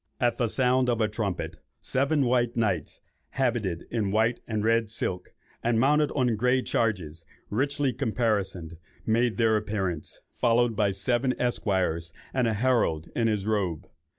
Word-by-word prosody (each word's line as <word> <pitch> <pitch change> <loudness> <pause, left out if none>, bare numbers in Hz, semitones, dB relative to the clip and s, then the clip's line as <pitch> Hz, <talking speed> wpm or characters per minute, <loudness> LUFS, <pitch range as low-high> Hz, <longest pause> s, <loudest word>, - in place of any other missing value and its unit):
At 120 -1 +1
the 120 - +2
sound 125 +2 +2
of 120 -2 +1
a 110 - +3
trumpet, 105 -4 -3 0.2
"seven 140 +2 +1
white 120 -1 +1
knights, 110 -3 -1 0.3
habited 115 -10 -1
in 110 -4 0
white 110 +4 +2
and 110 -2 -2
red 115 0 +2
silk, 95 -5 -4 0.3
and 115 -1 +2
mounted 150 +4 +3
on 125 -5 +1
grey 125 +3 +2
chargers, 85 -8 -1 0.3
richly 140 +3 0
caparisoned," 105 - -1 0.3
made 115 +1 +1
their 115 -2 +3
appearance, 95 -7 -3
followed 120 -1 +2
by 105 -1 +2
seven 120 +6 0
esquires, 95 -9 -1 0.2
and 125 -3 +2
a 110 - 0
herald 105 -9 +1
in 115 -1 +2
his 105 -3 0
robe. 100 -7 -1
115 Hz, 150 wpm, -27 LUFS, 100-125 Hz, 0.3 s, a